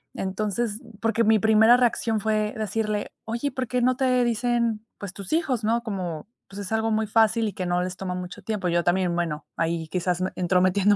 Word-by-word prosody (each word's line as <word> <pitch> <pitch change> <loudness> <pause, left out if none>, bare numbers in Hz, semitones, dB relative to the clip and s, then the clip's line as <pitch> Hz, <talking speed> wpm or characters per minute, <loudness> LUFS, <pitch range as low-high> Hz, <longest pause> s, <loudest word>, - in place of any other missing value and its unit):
Entonces, 210 +4 -2 0.2
porque 225 0 +1
mi 220 0 +5
primera 220 +3 +6
reacción 230 -2 +1
fue 215 0 0
decirle: 215 0 -2
"Oye, 235 +6 -2
¿por 255 0 -3
qué 250 +1 0
no 255 +1 +3
te 255 -1 +2
dicen, 235 -1 0
pues, 200 -2 -7
tus 195 -2 -9
hijos?", 270 -8 0
¿no? 230 +2 +1
Como, 185 -6 -4 0.2
pues, 195 +1 -10
es 200 +1 -7
algo 220 0 +1
muy 220 0 +1
fácil 220 +1 +3
y 205 - -4
que 185 -1 -4
no 175 0 +1
les 185 0 -5
toma 180 -2 -4
mucho 180 +1 -7
tiempo, 210 -4 -2
yo 170 0 +1
también, 180 0 +1
bueno, 165 -3 -2
ahí 165 -1 -1
quizás 180 +1 -1
entrometiéndome 185 +3 +3
215 Hz, 195 wpm, -25 LUFS, 185-230 Hz, 0.2 s, primera